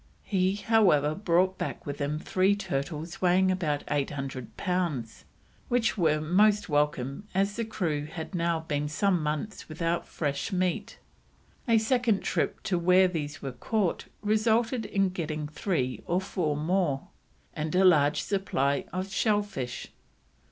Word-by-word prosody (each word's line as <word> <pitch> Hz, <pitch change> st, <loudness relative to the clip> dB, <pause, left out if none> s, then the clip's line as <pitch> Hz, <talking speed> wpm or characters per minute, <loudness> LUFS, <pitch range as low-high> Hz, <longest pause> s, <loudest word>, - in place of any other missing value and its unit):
He, 190 Hz, -1 st, +1 dB
however, 200 Hz, -9 st, +3 dB
brought 185 Hz, 0 st, +1 dB
back -, -, -4 dB
with 145 Hz, 0 st, -5 dB
him 145 Hz, +2 st, -1 dB
three 190 Hz, +5 st, +2 dB
turtles 160 Hz, 0 st, -4 dB
weighing 185 Hz, +1 st, +4 dB
about 155 Hz, -6 st, -1 dB
800 135 Hz, -5 st, -3 dB
pounds, 170 Hz, -, -2 dB, 0.4 s
which 240 Hz, -2 st, +2 dB
were 160 Hz, -6 st, +2 dB
most 200 Hz, +6 st, +3 dB
welcome 145 Hz, +3 st, 0 dB
as 200 Hz, +1 st, +1 dB
the 235 Hz, -, -1 dB
crew 170 Hz, -9 st, -2 dB
had 160 Hz, +3 st, -7 dB
now 170 Hz, -2 st, 0 dB
been 150 Hz, -2 st, -2 dB
some 180 Hz, +3 st, +1 dB
months 155 Hz, +8 st, -3 dB
without 165 Hz, +2 st, -1 dB
fresh 145 Hz, -3 st, -2 dB
meat; 185 Hz, -2 st, -1 dB, 0.7 s
a 230 Hz, -1 st, +5 dB
second 225 Hz, -2 st, +2 dB
trip -, -, -1 dB
to 195 Hz, -5 st, 0 dB
where 185 Hz, +2 st, +5 dB
these 150 Hz, -4 st, -4 dB
were 135 Hz, -, -3 dB
caught 190 Hz, -, -1 dB, 0.2 s
resulted 225 Hz, +2 st, +2 dB
in 195 Hz, -2 st, +1 dB
getting 155 Hz, -4 st, -3 dB
three 150 Hz, -5 st, -2 dB
or 175 Hz, +2 st, +2 dB
four 175 Hz, -6 st, -2 dB
more, 160 Hz, -3 st, +1 dB, 0.5 s
and 155 Hz, +3 st, -3 dB
a 190 Hz, +1 st, +5 dB
large 150 Hz, -5 st, +4 dB
supply 140 Hz, -9 st, 0 dB
of 185 Hz, +1 st, -4 dB
shell 210 Hz, -2 st, +2 dB
fish. 130 Hz, -12 st, -6 dB
175 Hz, 145 wpm, -28 LUFS, 150-195 Hz, 0.7 s, a